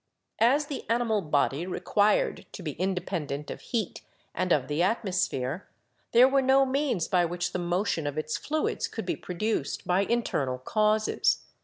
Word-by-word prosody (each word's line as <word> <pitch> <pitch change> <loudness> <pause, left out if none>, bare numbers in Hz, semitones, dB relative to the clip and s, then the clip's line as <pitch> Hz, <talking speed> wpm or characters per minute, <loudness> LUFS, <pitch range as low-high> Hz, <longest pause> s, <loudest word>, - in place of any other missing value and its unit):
As 275 +6 +4
the 285 -1 -5
animal 230 -2 +1
body 150 +1 0
required 205 +3 +1
to 185 - -8
be 155 - -3
independent 170 -4 -3
of - - -7
heat 225 -6 -3 0.3
and 185 -1 -1
of 140 -6 +3
the 150 +3 -1
atmosphere, 180 - -1 0.4
there 245 +2 +7
were 270 0 +3
no 265 +1 +4
means 260 - 0
by 180 -1 +3
which 175 +1 -2
the - - -1
motion 175 -2 -1
of 145 +1 -4
its 155 0 -2
fluids 310 +1 -1
could - - -6
be - - -1
produced 180 -4 -3
by 180 +2 +2
internal 145 - 0
causes. 215 - +1
185 Hz, 160 wpm, -28 LUFS, 160-230 Hz, 0.4 s, there